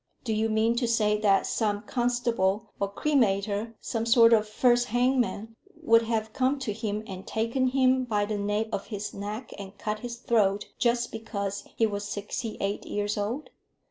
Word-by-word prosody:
Do 225 - -1
you 220 +1 +1
mean 220 +2 +2
to 240 -1 +1
say 210 -2 +2
that 200 -2 +4
some 210 -2 -1
constable 240 -5 0
or 200 0 -1
cremator, 215 -4 +1
some 225 0 -3
sort 230 0 +7
of 215 -1 +3
first 245 +2 +3
hangman, 245 -2 0 0.2
would 230 -7 +5
have 220 -1 -2
come 265 +2 +1
to 250 -6 -3
him 215 -1 -3
and 190 -2 -8
taken 230 +4 0
him 260 0 +3
by 210 -3 0
the 210 0 -3
nape 205 +2 -1
of 200 - -3
his 210 -2 -5
neck, 210 +4 -6
and 200 0 -9
cut 210 0 -3
his 240 +1 -5
throat, 210 -4 +1
just 240 0 +1
because 200 -3 -4
he 225 - +3
was 205 -1 -2
sixty 210 +3 -4
eight 200 +1 -2
years 205 0 -2
old? 225 +9 -3
220 Hz, 175 wpm, -27 LUFS, 205-240 Hz, 0.2 s, sort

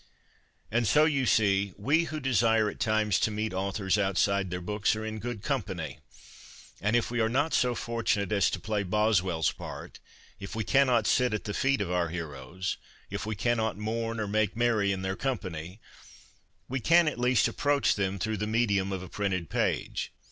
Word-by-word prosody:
And 120 0 +1
so, 150 +6 +5
you 140 -5 +1
see, 100 -3 +2
we 150 +11 +2
who 155 -1 -4
desire 115 -4 +3
at - - -15
times 110 -4 +2
to - - +2
meet 110 -1 -3
authors 95 +1 0
outside 100 0 +1
their 90 0 -3
books 105 +4 0
are 110 0 -5
in 110 0 -4
good 115 -2 -5
company. 95 - -3 0.8
And 105 +3 +1
if 120 0 +1
we 120 - -1
are 110 -1 +2
not 145 +7 +1
so 125 -1 +2
fortunate 115 -5 -1
as 100 -3 +3
to 90 - -3
play 105 +2 -1
Boswell's 95 -5 +1
part, - - -9 0.4
if 100 -1 -7
we 110 - -1
cannot 125 -2 +3
sit 125 -1 +2
at 105 - -4
the 105 - -4
feet 135 0 +1
of 95 -3 -2
our 90 -2 +1
heroes, 85 +1 -5 0.3
if - - -4
we 110 - -2
cannot 110 0 0
mourn 115 +2 -3
or 110 - -2
make 110 +1 0
merry 115 -4 +2
in 95 -1 -3
their 95 0 -2
company, 90 -7 -4 0.9
we 135 +1 -2
can, 165 +6 +4
at 150 - -2
least, 125 -1 +3
approach 145 -1 +2
them 95 -1 -1
through 110 +3 -2
the 105 +2 -2
medium 105 -4 +1
of 95 -1 -3
a - - -8
printed 95 -3 -2
page. - - -1
105 Hz, 190 wpm, -28 LUFS, 95-120 Hz, 0.9 s, so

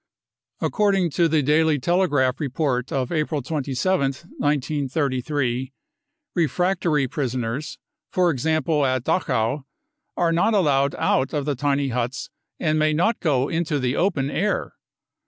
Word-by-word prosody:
According 195 -5 +1
to 170 +3 +3
the 155 -2 +2
Daily 155 +2 +3
Telegraph 145 -4 +1
report 135 -3 -1
of 130 -2 -1
April 155 -3 -1
27th, 140 +1 -1
1933, 140 -2 -1 0.6
refractory 170 -3 +1
prisoners, 130 0 -3 0.3
for 180 -2 +2
example 155 +1 +1
at 130 -2 +1
Dachau, 135 -4 0 0.5
are 170 -1 +2
not 175 +7 +2
allowed 140 -7 +2
out 135 +3 +1
of 145 -2 -1
the 145 - 0
tiny 140 0 0
huts 125 +2 -3 0.3
and 155 -2 +1
may 155 0 +2
not 210 +9 +1
go 140 -5 +1
into 160 -2 -1
the 130 -1 -1
open 150 -7 0
air. 205 +7 -1
145 Hz, 125 wpm, -23 LUFS, 130-165 Hz, 0.6 s, to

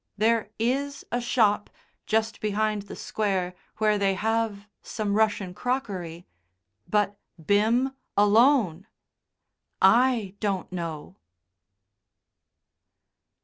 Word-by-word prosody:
There 220 0 +2
is 275 +5 -1
a 245 - 0
shop, 215 -4 +2 0.4
just 220 0 0
behind 215 0 0
the - - -7
Square, 190 -4 -2 0.2
where 215 -1 +2
they 195 -1 +2
have 220 0 -1 0.2
some 210 -3 -3
Russian 205 -3 +1
crockery. 185 -9 -3 0.6
But 205 -1 0 0.3
Bim 225 - +3 0.3
alone! 210 - +4 0.9
I 230 -1 +4
don't 195 -4 -2
know. 165 -4 -6
210 Hz, 90 wpm, -26 LUFS, 195-230 Hz, 0.9 s, alone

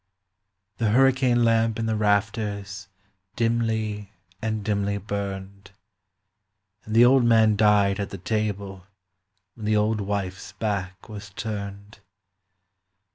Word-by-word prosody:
The 115 -2 +1
hurricane 130 0 +3
lamp 115 -1 +2
in 115 - -2
the 110 0 0
rafters 100 -1 -1 0.5
dimly 110 -3 -1 0.3
and 110 -2 -3
dimly 100 -1 0
burned; 100 -1 -6 1.2
And 110 - -4
the 120 +1 +8
old 130 0 +5
man 110 -2 +4
died 105 -1 +3
at 100 - -3
the 95 - -7
table 100 -2 -3 0.7
when 105 +1 -7
the 110 0 +3
old 105 0 +1
wife's 95 -2 -4
back 95 -3 -4
was 105 -2 -9
turned. 100 0 -6
105 Hz, 115 wpm, -25 LUFS, 100-110 Hz, 1.2 s, the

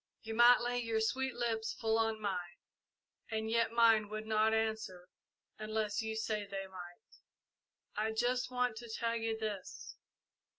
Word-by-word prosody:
You 225 0 -5
might 240 +2 +7
lay 245 0 0
your 230 -2 0
sweet 260 +4 0
lips 225 -2 -1
full 225 0 +1
on 225 -1 +1
mine, 180 -4 -3 0.7
and 220 0 -2
yet 230 0 +2
mine 225 -3 +4
would 215 +1 -5
not 220 0 +3
answer 220 -5 -2 0.5
unless 215 0 -1
you 220 0 -3
said 215 -2 -2
they 195 -1 -4
might. 180 -2 -12 0.9
I - - -1
just 245 +3 0
want 250 -3 0
to 235 0 -8
tell 230 +1 -1
you 225 -1 -1
this. 210 -4 -6
220 Hz, 155 wpm, -34 LUFS, 215-230 Hz, 0.9 s, might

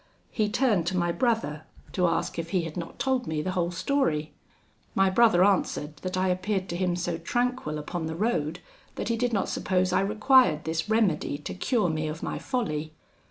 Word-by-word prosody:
He 215 -2 0
turned 210 -8 +2
to 185 +1 0
my 175 -1 +1
brother, 225 - 0 0.3
to 180 -2 +2
ask 165 0 -1
if 165 0 -4
he 180 -2 +1
had 165 -2 -6
not 170 -2 -6
told 260 -2 0
me 155 -1 -1
the 185 - -1
whole 175 -2 0
story. 170 - 0 0.6
My 195 0 +4
brother 200 -4 +5
answered, 155 -6 0
that 185 +4 -4
I 185 0 +2
appeared 185 +1 -1
to 170 - -3
him 180 -1 0
so 175 -1 -2
tranquil 240 -4 -1
upon 160 +2 -4
the 160 - -4
road, 170 -6 -1 0.3
that - - -3
he 230 - +2
did 245 +1 0
not 200 -4 0
suppose 185 -1 0
I - - +4
required 215 - +4
this 160 +4 -2
remedy 215 -10 +1
to 145 - -6
cure 215 -1 +1
me 155 0 -2
of 155 +1 -5
my - - -3
folly. 155 - -2
185 Hz, 200 wpm, -27 LUFS, 160-220 Hz, 0.6 s, brother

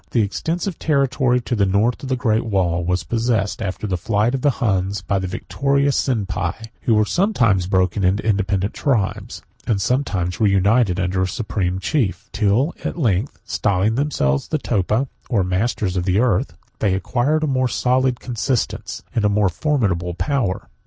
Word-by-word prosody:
The 115 - +2
extensive 170 - -3
territory 135 -4 +2
to 120 - -2
the 100 -3 +2
north 105 +5 +1
of 135 - -6
the 130 - +1
great 115 -3 +1
wall 90 -5 0
was 90 +1 0
possessed, 115 -4 -1
after 100 0 -3
the 95 -3 -1
flight 110 +3 +1
of 135 - -1
the 145 - +3
Huns, 95 -3 0
by 100 0 0
the 95 - -3
victorious 140 +8 0
Sienpi, 100 -8 -1 0.3
who 115 - +2
were 105 0 +3
sometimes 115 - +2
broken 95 0 +1
into 95 +4 +1
independent 100 -2 0
tribes, 120 -9 -1 0.2
and 105 -4 +1
sometimes 95 -8 -1
reunited 100 -1 +3
under 95 0 0
a 95 - +1
supreme 95 -2 -2
chief; 110 0 -1
till 115 - +1
at - - -3
length, 115 - 0
styling 100 +1 +1
themselves 115 - 0
Topa, 120 - 0 0.2
or 105 -6 +2
masters 95 +1 -1
of 90 -1 -1
the 95 0 +2
earth, 110 -5 +1 0.2
they 100 -3 +2
acquired 130 - 0
a - - +3
more 130 -3 +1
solid 125 +1 +1
consistence, 125 0 -2
and 115 - 0
a 105 - +4
more 100 -1 +2
formidable 90 - -1
power. 125 -6 -1
105 Hz, 165 wpm, -20 LUFS, 95-125 Hz, 0.3 s, a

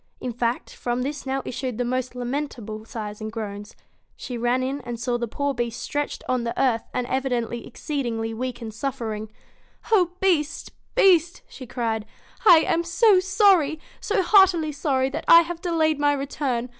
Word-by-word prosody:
In 250 -2 -4
fact, 235 +1 -2
from 245 +1 -2
this 280 0 -5
now 265 0 -1
issued 255 -2 -4
the 245 - -1
most 255 0 -2
lamentable 245 -4 -4
sighs 210 -2 -7
and 215 0 -4
groans. 205 -2 -6 0.4
She 250 - -7
ran 240 +2 +1
in 275 +2 -3
and 240 -2 -6
saw 240 0 -1
the 235 - -2
poor 280 +5 -2
Beast 240 -2 -3
stretched 290 0 -3
on 255 -2 0
the 235 - -3
earth, 245 -4 +1
and 250 - -2
evidently 245 -3 -2
exceedingly 235 -6 -3
weak 250 +1 -4
and 220 -1 -6
suffering. 220 -4 -4 0.6
'O 360 -5 +4
Beast! 335 -6 0 0.2
Beast!' 350 -3 +4
she 255 - -11
cried; 225 -3 -2 0.4
'I 335 -4 +9
am 335 +1 +1
so 380 +3 +4
sorry! 375 -6 +3 0.2
So 410 -2 0
heartily 355 -5 +5
sorry 270 -2 0
that 300 - -5
I 335 - +9
have 340 0 -6
delayed 320 -4 +1
my 290 0 +3
return. 270 -3 -2
260 Hz, 170 wpm, -24 LUFS, 235-310 Hz, 0.6 s, I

